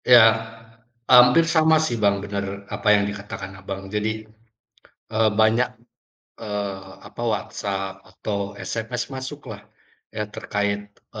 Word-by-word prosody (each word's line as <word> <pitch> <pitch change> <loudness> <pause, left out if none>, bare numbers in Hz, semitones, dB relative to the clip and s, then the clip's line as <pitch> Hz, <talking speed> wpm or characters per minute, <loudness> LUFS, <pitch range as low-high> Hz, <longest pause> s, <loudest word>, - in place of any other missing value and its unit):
Ya 125 - +8 0.9
hampir 125 +6 +7
sama 160 -1 +4
sih 120 - -1
Bang, 100 -1 +2
bener 100 0 -4
apa - - -4
yang 100 -1 +2
dikatakan 100 -1 -7
Abang 95 +1 -6
jadi, 110 +1 -1 0.8
e 110 - -4 0.2
banyak 110 +3 +4 0.7
eee 100 -3 -4
apa - - -8
WhatsApp 95 -4 -3
atau 100 +1 -4
SMS 120 +2 -3
masuk 130 +3 -6
lah 100 - -13 0.5
ya 105 -1 -3
terkait 100 0 -2 0.3
e - - -6
105 Hz, 125 wpm, -23 LUFS, 100-120 Hz, 0.9 s, Ya